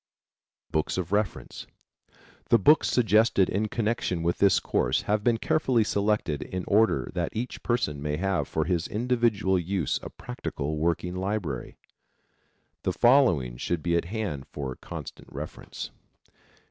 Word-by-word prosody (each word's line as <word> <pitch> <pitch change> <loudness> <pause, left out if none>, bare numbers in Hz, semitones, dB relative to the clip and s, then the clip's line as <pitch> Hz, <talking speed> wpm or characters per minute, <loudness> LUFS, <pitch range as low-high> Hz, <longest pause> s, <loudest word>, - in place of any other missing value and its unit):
BOOKS 80 +3 0
OF 90 -1 -3
REFERENCE. 105 -1 -2 0.8
The 115 - +7
books 150 +10 +5
suggested 110 -4 +3
in 105 +3 0
connection 105 -6 -1
with 85 +1 0
this 100 -2 +5
course - - 0
have 105 0 0
been 120 0 +3
carefully 130 -3 +2
selected 100 -8 0
in 90 -1 -5
order 110 +2 +2
that 85 -2 -1
each 120 +3 -4
person 115 - -1
may 75 0 -2
have 95 +1 0
for 80 -1 -1
his 85 -1 0
individual 110 -5 +1
use 90 -1 -1
a - - -7
practical 70 +4 -5
working 85 +2 0
library. 95 - -3 1.0
The - - -1
following 115 - +4
should 85 +5 -2
be 85 -1 +1
at 85 - +1
hand 95 - -4
for 65 -3 -5
constant - - -9
reference. - - -7
95 Hz, 140 wpm, -27 LUFS, 85-110 Hz, 1.0 s, The